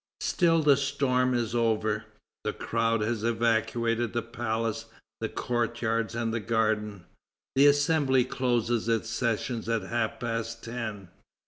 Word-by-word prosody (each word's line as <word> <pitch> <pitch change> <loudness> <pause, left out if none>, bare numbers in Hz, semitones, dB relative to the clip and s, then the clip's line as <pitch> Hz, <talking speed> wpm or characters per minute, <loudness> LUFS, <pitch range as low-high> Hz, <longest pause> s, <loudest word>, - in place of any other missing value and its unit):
Still, 165 -3 +2
the 145 -2 +6
storm 130 -2 +1
is 120 -1 -1
over. 110 -2 +1 0.4
The - - -1
crowd 115 -1 0
has 110 0 -1
evacuated 115 0 +1
the 120 -1 -1
palace, 115 -1 -2 0.3
the 110 - -2
courtyards, 115 -2 -1
and 115 -1 -1
the 115 - 0
garden. 110 -4 -1 0.5
The 140 +2 +7
Assembly 145 -3 +3
closes 120 -3 0
its 115 -2 0
sessions 115 0 -1
at 115 -3 0
half 115 +2 -2
past 115 -1 -3
ten. 110 -5 -5
115 Hz, 130 wpm, -28 LUFS, 110-125 Hz, 0.5 s, The